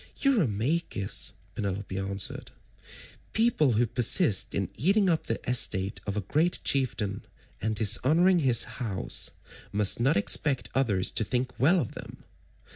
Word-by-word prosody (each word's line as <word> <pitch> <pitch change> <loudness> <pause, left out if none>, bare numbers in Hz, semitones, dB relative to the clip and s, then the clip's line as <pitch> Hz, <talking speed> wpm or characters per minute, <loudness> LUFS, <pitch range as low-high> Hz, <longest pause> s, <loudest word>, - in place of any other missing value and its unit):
"Eurymachus," 150 - 0 0.2
Penelope 100 -1 -5
answered, 95 0 -3 0.8
"people 220 - +2
who 115 +3 +2
persist 120 - +3
in 100 -1 -3
eating 190 - +2
up 160 - -2
the 115 - -2
estate 100 -6 +2
of 100 +1 -3
a - - -1
great 155 - 0
chieftain 110 -7 -2 0.4
and 110 +1 -2
dishonouring 150 - +3
his 125 -6 +3
house 110 -7 -1 0.4
must 105 +1 +1
not 130 +1 +2
expect 130 +6 0
others 105 -9 0
to - - -2
think 125 +4 -2
well 165 +8 +4
of 125 - -4
them. - - -10
120 Hz, 130 wpm, -27 LUFS, 100-155 Hz, 0.8 s, well